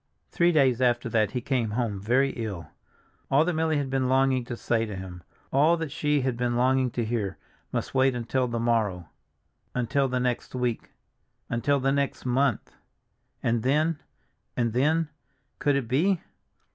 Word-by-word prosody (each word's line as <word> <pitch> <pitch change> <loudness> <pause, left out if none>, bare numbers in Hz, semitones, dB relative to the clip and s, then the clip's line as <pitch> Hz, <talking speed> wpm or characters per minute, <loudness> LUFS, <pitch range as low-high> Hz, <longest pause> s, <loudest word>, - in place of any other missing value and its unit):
Three 175 0 +3
days 130 -6 +3
after 120 -1 +2
that 110 -3 +2
he 125 +3 -3
came 125 -3 0
home 110 -5 -1
very 130 +7 +2
ill. 105 -8 -5 0.6
All 140 +4 +4
that 180 - 0
Milly 160 -1 +1
had 140 -2 -2
been 130 -1 +1
longing 130 -1 +3
to 120 0 -5
say 115 -1 0
to 105 - -6
him, 95 -2 -8 0.3
all 155 +5 +4
that 160 -3 -4
she 150 -1 +1
had 130 -2 -1
been 120 0 -1
longing 130 +1 +2
to 120 - -1
hear, 110 -4 -2 0.3
must - - -3
wait 130 -1 +3
until 125 +2 -1
the 120 -1 -2
morrow—until 115 - -2
the 125 -1 -1
next 125 0 -2
week—until 125 +2 -3
the 135 +1 +1
next 140 -1 -1
month; 130 -1 0 0.7
and 115 0 +1
then, 150 +5 +1 0.6
and 115 -3 +1
then, 155 +6 +2 0.5
could 145 -1 +2
it 135 -4 -1
be? 165 - +2
125 Hz, 160 wpm, -26 LUFS, 115-140 Hz, 0.7 s, All